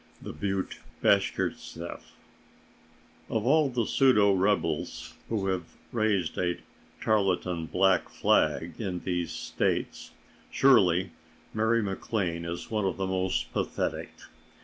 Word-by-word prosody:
THE - - -7
BUTTE 95 -1 -3 0.2
BASHKIRTSEFF 85 +1 0 1.3
Of 110 0 -1
all 150 +2 +4
the 120 -3 0
pseudo 105 -7 +4
rebels 85 -4 0 0.2
who 105 -4 -1
have 90 -3 -3 0.2
raised 105 -7 0
a 90 -1 0 0.4
tarletan 90 -5 0
black 95 +2 +2
flag 80 +3 +1
in 90 -4 -3
These 90 -3 -2
States, - - -2 0.4
surely 95 -9 +4 0.4
Mary 110 +1 +2
MacLane 95 -4 -2
is 85 +5 -6
one 105 -2 0
of 95 - -1
the 95 - -1
most 95 0 -1
pathetic. - - -2
95 Hz, 110 wpm, -28 LUFS, 90-110 Hz, 1.3 s, all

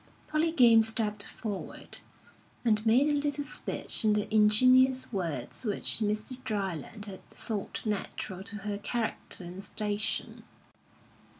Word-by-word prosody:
Polly 310 +2 +1
Game 235 -7 +6
stepped 220 -2 +1
forward, 210 -4 -5 0.7
and 215 -2 +2
made 245 +6 +5
a 295 -1 +2
little 290 0 -2
speech 285 - -1
in 215 -1 +4
the 210 -1 0
ingenuous 255 +5 +5
words 165 - -4
which 210 -1 +1
Mr. 215 +4 -2
Dryland 200 0 -4
had 195 -3 -10
thought 215 -1 -5
natural 195 -3 -4
to 210 - -6
her 205 -1 -3
character 220 -3 -2
and 180 +3 -8
station. 210 0 -2
215 Hz, 125 wpm, -29 LUFS, 205-250 Hz, 0.7 s, Game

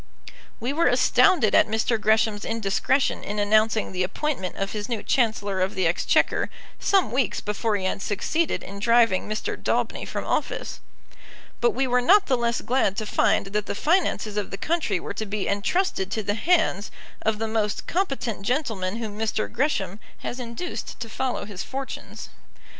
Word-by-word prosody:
We 245 +4 -2
were 335 +3 +3
astounded 325 - +4
at - - +6
Mr. 220 +1 0
Gresham's 215 -1 +2
indiscretion 225 +5 0
in 205 +1 -4
announcing 215 +1 +2
the 185 -1 -2
appointment 190 0 -2
of 195 0 -3
his 210 +1 -4
new 230 -3 -2
Chancellor 205 -6 +1
of 190 +2 0
the 185 - +1
Exchequer 165 +1 +2 0.3
some 390 -2 +2
weeks 250 -3 0
before 210 +1 -1
he 190 -2 -2
had 190 - -1
succeeded 310 - -1
in 200 +1 -8
driving 230 -3 +3
Mr. 215 0 -2
Daubeny - - -1
from - - -4
office; - - -2 0.8
but 475 - +2
we 270 - +2
were 250 -1 +2
not 395 +10 +5
the 265 - +2
less 235 -1 0
glad 240 -6 +1
to 220 - -2
find 195 -1 +1
that 210 0 -1
the - - -3
finances 300 - +1
of 205 - -1
the 195 - -5
country 310 - 0
were - - -5
to 220 - -4
be 205 0 -2
entrusted 200 - 0
to 220 +1 -2
the 205 - 0
hands 315 - +1 0.3
of 220 -1 +1
the 225 +1 -2
most 215 -2 -1
competent 275 - -1
gentleman 215 -5 -1
whom 220 -2 -5
Mr. 220 -1 -1
Gresham 225 -7 -1 0.2
has 250 - -4
induced 240 +8 -5
to 230 - -5
follow 255 0 -2
his 200 -3 -6
fortunes. 270 0 -6
220 Hz, 175 wpm, -25 LUFS, 205-260 Hz, 0.8 s, at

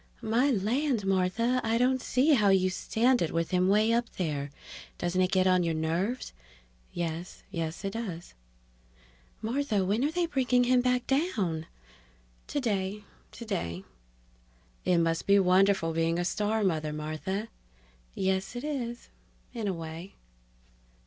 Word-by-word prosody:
"My 235 +6 +2
land, 240 +1 0
Martha, 195 +7 +1
I 225 +1 +1
don't 255 +1 +2
see 270 +6 +3
how 210 -7 +4
you 185 -1 +3
stand 240 +6 +1
it 165 - 0
with 165 0 -1
him 180 0 +3
way 215 +3 +4
up 235 0 +1
there! 145 -5 -2 0.5
Doesn't 175 +1 0
it 185 0 +2
get 185 -1 +3
on 185 -1 +4
your 165 -2 0
nerves?" 170 - -2 0.6
("Yes... 170 0 -5
Yes, 165 +1 -4
it 195 - -1
does.") 190 -7 -6 1.1
"Martha, 225 -4 0
when 210 +6 +1
are 290 - +2
they 345 +2 0
bringing 255 -5 +2
him 250 0 +4
back 250 0 +1
down?" 210 - 0 0.8
("Today... 210 -6 -2 0.3
Today!") 135 - -4 1.0
"It 180 - +3
must 165 -1 0
be 200 0 +6
wonderful 190 -2 +3
being 165 +1 +1
a 175 - -1
star 210 +3 0
mother, 155 -5 0
Martha." 155 +8 -3 0.7
("Yes, 190 +3 -1
it 245 - -5
is 245 -6 -4 0.4
in 225 -4 -3
a 195 - 0
way.") 165 +2 -8
195 Hz, 140 wpm, -29 LUFS, 175-240 Hz, 1.1 s, be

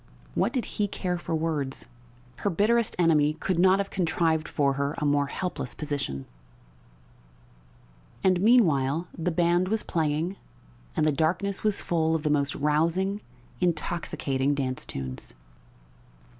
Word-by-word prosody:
What - - +1
did 255 -4 -1
he 210 - -1
care 180 -2 -2
for 165 - -2
words? 155 -4 -2 0.5
Her 205 - 0
bitterest 220 +5 +2
enemy 155 -4 +4
could 175 +2 -1
not 190 +1 +6
have 200 0 -2
contrived 165 -3 +1
for 140 -2 +1
her 140 +2 -1
a 150 - -1
more 145 -1 +2
helpless 175 -4 -4
position. 140 - -3 2.0
And 185 -2 +3
meanwhile 170 - +4
the 175 +1 -1
band 175 +1 +2
was 220 +2 0
playing 160 +3 -1 0.6
and - - +2
the 155 - +4
darkness 180 +7 0
was 210 -2 0
full 160 -1 +1
of 155 - -2
the 150 - +1
most 145 -1 +1
rousing, 165 +7 +1 0.4
intoxicating 155 -5 0
dance 130 -2 -3
tunes. 65 -2 -6
160 Hz, 135 wpm, -27 LUFS, 145-185 Hz, 2.0 s, not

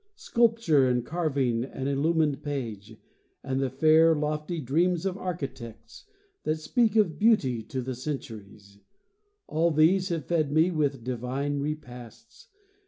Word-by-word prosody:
Sculpture 225 - +2
and 125 -1 0
carving 140 -8 -1
and 135 +1 -5
illumined 150 +1 +1
page, 115 -7 -5 0.5
And 135 -1 -2
the 135 - 0
fair, 160 +4 +4
lofty 150 +2 -2
dreams 165 +6 0
of 190 -2 -1
architects, 135 - -7 0.4
That 155 - -1
speak 225 +8 0
of 200 -8 +2
beauty 150 - +3
to 130 +2 -4
the 130 +1 -4
centuries— 105 -7 -8 0.7
All 165 +2 +1
these 170 +5 +3
have 165 -3 -3
fed 155 -4 0
me 160 +4 +3
with 145 -6 -1
divine 130 +4 -3
repasts. 125 -5 -8
145 Hz, 130 wpm, -27 LUFS, 130-165 Hz, 0.7 s, fair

